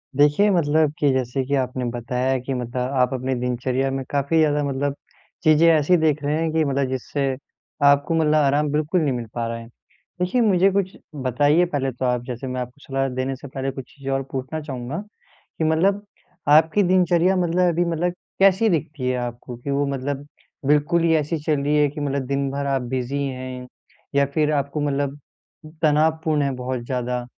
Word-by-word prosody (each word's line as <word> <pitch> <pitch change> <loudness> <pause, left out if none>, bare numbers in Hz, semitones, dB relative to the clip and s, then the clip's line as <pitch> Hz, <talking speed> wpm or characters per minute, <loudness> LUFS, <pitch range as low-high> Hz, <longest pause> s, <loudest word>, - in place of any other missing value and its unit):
देखिए, 150 +9 +4
मतलब 155 -4 +2
की 145 -2 +3
जैसे 130 +1 -1
की 140 +2 0
आपने 130 -1 -1
बताया 125 +2 -1
कि 130 +2 -4
मतलब 125 0 -4 0.2
आप 125 +1 +2
अपने 130 +1 -2
दिनचर्या 125 +2 -1
में 135 0 -2
काफ़ी 140 +3 0
ज़्यादा 150 -2 +3
मतलब 140 0 -1 0.5
चीज़ें 155 +1 +5
ऐसी 160 +2 +4
देख 155 -2 +1
रहे 145 +1 0
हैं 165 -1 0
कि 160 0 +2
मतलब 140 -1 0
जिससे 135 +2 -2 0.6
आपको 140 +3 +4
मतलब 155 -1 +3
आराम 145 0 +3
बिल्कुल 155 +4 +1
नहीं 145 -4 +1
मिल 120 -1 -4
पा 115 -1 -2
रहा 115 0 -3
है। 115 0 -10 0.5
देखिए, 180 +7 +1
मुझे 195 -4 +4
कुछ 190 -1 -1 0.2
बताइए 145 +6 +2
पहले 140 -5 -2
तो 130 +1 -4
आप 125 -1 +1
जैसे 125 +1 -5
मैं 125 0 -3
आपको 125 +3 -8
सलाह 135 0 0
देने 130 +1 -2
से 135 - -10
पहले 135 0 -3
कुछ 135 -1 -8
चीज़ें 135 -1 -5
और 135 0 0
पूछना 135 +4 -4
चाहूँगा 130 0 -5 0.6
कि - - -1
मतलब 195 +6 +2 0.4
आपकी 160 +6 +5
दिनचर्या 180 0 +3
मतलब 180 0 +2
अभी 175 +2 +1
मतलब 170 +1 -1 0.3
कैसी 195 +3 +5
दिखती 155 -6 -2
है 125 - 0
आपको? 120 0 -6
की 125 +4 -7
वो 140 +1 +1
मतलब 140 +1 -3 0.4
बिल्कुल 150 +4 +3
ही 165 -1 +3
ऐसी 155 +2 0
चल 150 -3 +1
रही 145 +1 +1
है 150 0 +4
कि 150 +2 -8
मतलब 140 -2 -1
दिन 140 0 -1
भर 140 +1 -3
आप 135 -1 +1
बिज़ी 130 +3 -1
हैं 130 -1 -5 0.5
या 140 - +4
फिर 155 -1 +2
आपको 140 0 -1
मतलब 145 0 -1 0.6
तनावपूर्ण 155 0 +2
है 140 - 0
बहुत 125 0 -3
ज़्यादा? 125 -1 -2
140 Hz, 190 wpm, -22 LUFS, 130-160 Hz, 0.6 s, चीज़ें